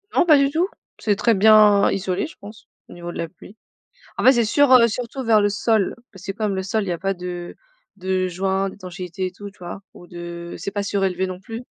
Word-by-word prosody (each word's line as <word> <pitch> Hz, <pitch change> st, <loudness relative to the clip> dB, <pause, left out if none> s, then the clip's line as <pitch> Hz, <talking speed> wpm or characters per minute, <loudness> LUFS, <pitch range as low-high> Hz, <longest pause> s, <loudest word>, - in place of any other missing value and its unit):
Non, 360 Hz, -, +4 dB
pas 310 Hz, -4 st, +7 dB
du 275 Hz, 0 st, +3 dB
tout. 335 Hz, +5 st, +1 dB, 0.3 s
C'est 210 Hz, -2 st, +1 dB
très 225 Hz, +3 st, +2 dB
bien 210 Hz, 0 st, +6 dB
isolé, 190 Hz, +6 st, -2 dB
je 320 Hz, -, -14 dB
pense, 210 Hz, +2 st, -12 dB, 0.2 s
au -, -, -11 dB
niveau 175 Hz, 0 st, -7 dB
de -, -, -8 dB
la 165 Hz, -, -3 dB
pluie, 190 Hz, +3 st, -16 dB, 0.6 s
en -, -, -1 dB
fait, 260 Hz, -, +8 dB
c'est 240 Hz, -3 st, +2 dB
sur, 285 Hz, +5 st, +3 dB
heu, 240 Hz, -2 st, +7 dB
surtout 245 Hz, +3 st, -5 dB
vers 220 Hz, -2 st, +4 dB
le 205 Hz, -, +3 dB
sol 205 Hz, 0 st, +1 dB, 0.2 s
parce 190 Hz, -2 st, -14 dB
que 195 Hz, -, -2 dB
comme 210 Hz, -1 st, -2 dB
le 190 Hz, -, -2 dB
sol, 215 Hz, +2 st, -1 dB
il -, -, -6 dB
y -, -, 0 dB
a 170 Hz, -, -3 dB
pas 195 Hz, +2 st, -1 dB
de 175 Hz, -1 st, -7 dB, 0.4 s
de 185 Hz, -1 st, -1 dB
joint 190 Hz, +2 st, -1 dB
d'étanchéité 185 Hz, -1 st, -7 dB
et 185 Hz, -, -6 dB
tout, 205 Hz, +2 st, -9 dB
tu 200 Hz, -, -26 dB
vois? 175 Hz, +2 st, -7 dB
Ou 175 Hz, -, -13 dB
de 175 Hz, -1 st, -8 dB
c'est 195 Hz, +4 st, -4 dB
pas 205 Hz, 0 st, -2 dB
surélevé, 190 Hz, -2 st, 0 dB
non 185 Hz, 0 st, -7 dB
plus. 225 Hz, +4 st, -7 dB
195 Hz, 245 wpm, -22 LUFS, 185-220 Hz, 0.6 s, fait